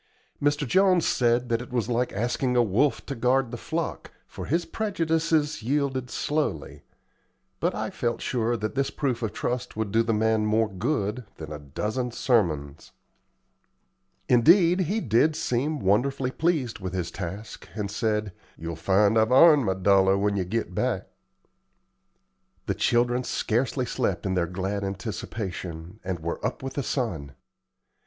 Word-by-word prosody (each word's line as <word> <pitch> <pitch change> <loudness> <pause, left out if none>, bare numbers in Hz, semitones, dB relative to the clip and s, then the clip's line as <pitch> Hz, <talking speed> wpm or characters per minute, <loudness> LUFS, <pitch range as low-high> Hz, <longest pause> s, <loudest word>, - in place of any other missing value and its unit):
Mr. 145 0 +1
Jones 185 +3 +4
said 120 0 +2
that 115 0 +1
it 125 - -10
was 120 -4 0
like 125 +1 0
asking 120 +4 -1
a 120 - +5
wolf 120 +7 +1
to 140 - -4
guard 125 0 +1
the - - -4
flock, 160 +7 -4 0.2
for - - -8
his 170 +4 +1
prejudices 160 - 0
yielded 130 0 -1
slowly; 145 - -2 0.8
but - - 0
I - - -3
felt 120 -1 -2
sure 120 -1 0
that 110 0 -3
this 135 0 0
proof 130 -5 -2
of 110 -3 -1
trust 125 +1 -3
would 110 -2 -2
do 115 - +4
the 115 0 0
man 110 0 +2
more 110 +1 +2
good 105 +2 -2
than 80 -2 -8
a 75 - -6
dozen 105 - -3
sermons. 80 - 0 1.3
Indeed, 170 - +5
he 195 +5 0
did 140 - +3
seem 145 +5 -1
wonderfully 130 +7 +1
pleased 145 -8 0
with 95 -1 -5
his 90 -2 -2
task, 95 +3 -7
and 105 -2 -3
said, 105 -2 -1 0.2
"Ye'll 85 0 -5
find 100 +6 +3
I've 110 +2 +2
'arned 145 0 +7
my 95 -1 +1
dollar 95 0 +4
when 100 +1 +1
ye 95 - 0
git 115 +5 -2
back." - - -1 1.6
The - - 0
children 120 +1 +2
scarcely 125 +3 0
slept 115 -7 -1
in 95 - 0
their 90 -2 +1
glad 95 +3 -3
anticipation, 95 -2 -5
and 90 -3 -3
were 85 +1 -4
up - - -3
with 135 - -4
the 140 - -2
sun. 90 - -3
115 Hz, 155 wpm, -26 LUFS, 100-135 Hz, 1.6 s, arned